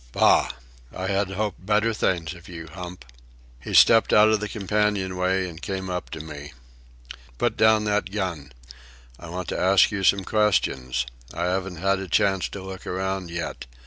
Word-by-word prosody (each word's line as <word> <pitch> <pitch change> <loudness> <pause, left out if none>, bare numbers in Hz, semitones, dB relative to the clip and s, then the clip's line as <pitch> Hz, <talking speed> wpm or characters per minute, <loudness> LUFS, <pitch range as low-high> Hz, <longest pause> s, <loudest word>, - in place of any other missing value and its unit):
Bah! - - +4 0.4
I 95 - -5
had 100 0 0
hoped 100 -1 -3
better 105 +3 +2
things 85 -6 -1
of 85 0 -14
you, 85 -2 -8
Hump." 90 -5 -8 0.5
He 65 - -5
stepped 115 -1 +6
out 105 +1 +6
of 110 -1 +2
the 105 0 -4
companion 105 -2 0
way 95 +1 0
and 85 -1 -10
came 95 -1 -4
up 90 0 -4
to - - -6
me. 75 -2 -9 0.8
"Put - - 0
down 110 -1 +4
that 105 -2 0
gun. 90 -9 -4 0.7
I 85 - -10
want 90 0 -5
to - - -3
ask 95 +1 +5
you 100 -2 -3
some 95 +1 +3
questions. 95 - +1 0.3
I 85 - -2
haven't 90 +1 -1
had 95 +3 0
a 95 - -6
chance 95 +4 +1
to 100 - -8
look 95 -1 -9
around 95 -1 -3
yet. 85 -5 -5
95 Hz, 175 wpm, -24 LUFS, 90-100 Hz, 0.8 s, stepped